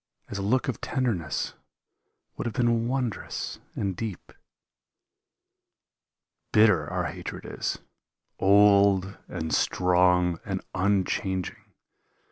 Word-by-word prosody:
As 100 - -4
a - - -2
look 120 +6 +1
of 130 - -3
tenderness 115 - -1 0.8
would - - -3
have 110 - -4
been 115 -1 +2
wondrous 125 -3 -3 0.2
and 95 -2 -2
deep. 110 -2 -6 2.2
Bitter 105 -4 +4
our - - -1
hatred - - -6
is, - - -3 0.6
old 100 -1 +5
and 80 -1 -3
strong 90 0 +3
and 95 -1 -4
unchanging. 95 -1 -1
100 Hz, 95 wpm, -27 LUFS, 90-115 Hz, 2.2 s, old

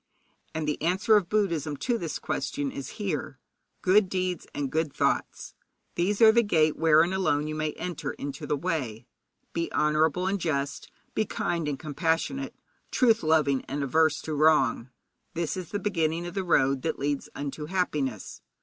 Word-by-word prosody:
And 155 -1 -2
the 150 - -2
answer 185 +7 +3
of 195 -4 +2
Buddhism 165 -9 0
to 240 - -1
this 160 -5 -3
question 140 -2 -3
is 140 - -7
here: 170 -10 -3 0.5
good 190 +1 +4
deeds 185 -1 -2
and 140 -2 -3
good 160 0 0
thoughts - - -1 0.4
these 200 +6 +1
are 220 - +9
the 235 +1 +4
gate 155 -8 +2
wherein 160 +2 +4
alone 150 -6 +1
you 155 - -3
may 155 -1 -2
enter 160 -5 -4
into 140 -1 -6
the 150 - 0
way. 135 -10 -3 0.5
Be 170 0 -2
honourable 155 +3 +2
and 195 0 0
just, 140 -4 -2 0.2
be 215 - +1
kind 170 -5 -2
and 145 -2 -2
compassionate, 165 - -1 0.3
truth 230 -4 +3
loving 155 -4 +2
and 140 +1 -3
averse 155 +2 +2
to 155 - -4
wrong 145 -5 +3 0.5
this 165 -2 -1
is 185 -3 -6
the 205 - -2
beginning 170 -4 -1
of 175 - -6
the 195 -1 -2
road 135 -6 +2
that 160 - -2
leads 145 0 -2
unto 145 +1 -5
happiness. 150 - -2
160 Hz, 170 wpm, -27 LUFS, 145-185 Hz, 0.5 s, are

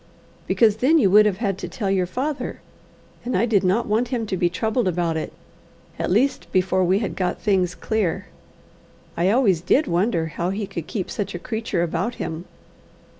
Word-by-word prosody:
"Because 220 -3 +3
then 275 +8 +4
you 200 -11 +3
would 210 +1 +7
have 195 -3 -1
had 200 -3 -2
to - - -5
tell 200 -6 -3
your 185 -2 +1
father, 275 +9 -3 0.6
and 245 -4 -1
I 215 - +3
did 215 -5 +2
not 190 +6 +2
want 225 +4 +1
him 240 -2 -2
to 200 - -2
be 175 -1 +1
troubled 220 +5 -1
about 170 -2 0
it, 160 - -3 0.7
at - - -1
least 240 +10 +1
before 185 0 +2
we 185 +2 +3
had 215 0 -3
got 180 -2 -1
things 185 -4 +1
clear. 215 -6 -1 0.9
I 175 +3 +2
always 205 -7 +3
did 270 - +3
wonder 175 -3 +1
how 170 +2 -3
he 200 +2 -2
could 170 -4 -6
keep 195 -5 -4
such 200 -3 -4
a - - -2
creature 220 -2 -2
about 175 +8 -2
him." 160 +2 -5
195 Hz, 190 wpm, -22 LUFS, 180-225 Hz, 0.9 s, would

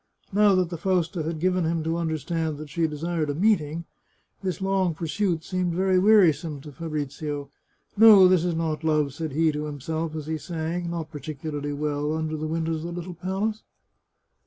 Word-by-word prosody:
Now 205 -1 +5
that 180 -2 +1
the 170 - -5
Fausta 175 -2 0
had 160 +1 -3
given 185 +1 +1
him 165 0 0
to 165 +1 -1
understand 160 -1 -2
that 150 -1 -9
she 165 +2 +1
desired 155 +1 -2
a 145 - -1
meeting, 170 -4 +1 0.6
this 185 -4 -2
long 190 -3 +1
pursuit 170 +1 -1
seemed 180 -2 -1
very 190 0 +2
weari 200 -4 +6
some 150 0 -7
to 150 - -10
Fabrizio. 145 -2 -4 0.2
" - - -40
No, 210 -3 +9
this 180 -2 +4
is 175 -2 0
not 160 -2 -2
love," 150 -3 +1
said 160 +1 -4
he 160 +1 +3
to 150 0 -3
him 145 -1 -6
self 160 +3 -3
as 155 -2 -5
he 160 0 -3
sang, 170 +1 -3
not 165 -2 -4
particularly 145 0 -5
well, 150 +1 -1
under 155 0 -2
the 155 0 -3
windows 160 0 -1
of 155 - -6
the - - -3
little 175 +1 -6
palace. 195 +5 -2
160 Hz, 195 wpm, -25 LUFS, 155-180 Hz, 0.6 s, No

